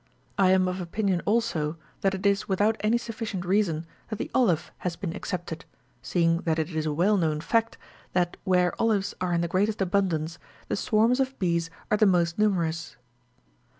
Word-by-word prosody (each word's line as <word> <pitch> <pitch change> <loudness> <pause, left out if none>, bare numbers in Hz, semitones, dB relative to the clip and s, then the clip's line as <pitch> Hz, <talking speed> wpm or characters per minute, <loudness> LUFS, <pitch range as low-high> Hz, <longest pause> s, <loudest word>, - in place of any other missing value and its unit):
I 190 -2 +4
am 185 0 +4
of 185 +1 -2
opinion, 185 0 -1
also, 185 -9 0 0.2
that 195 0 +1
it 190 - -6
is 200 0 +2
without 205 +3 +2
any 220 +3 +2
sufficient 225 -6 -5
reason 175 -4 +1 0.2
that 215 - -2
the - - -5
olive 195 -11 +2
has 180 -2 -3
been 170 -3 -4
excepted, 175 -3 -5 0.4
seeing 165 -1 +1
that 160 -2 0
it 160 +2 -1
is 155 -1 -2
a - - 0
well 185 +8 +3
known 155 -4 +1
fact, 225 +7 0 0.4
that 175 -1 +1
where 180 -2 +2
olives 210 -4 +1
are 180 -1 0
in 170 - +2
the 170 - 0
greatest 205 +5 0
abundance, 175 -4 0 0.3
the - - +1
swarms 225 +5 +2
of 265 0 -1
bees 170 -3 0 0.2
are 210 - +4
the 215 - +5
most 170 -1 +2
nu 215 0 +5
merous. 165 -4 -2
185 Hz, 185 wpm, -27 LUFS, 170-210 Hz, 0.4 s, the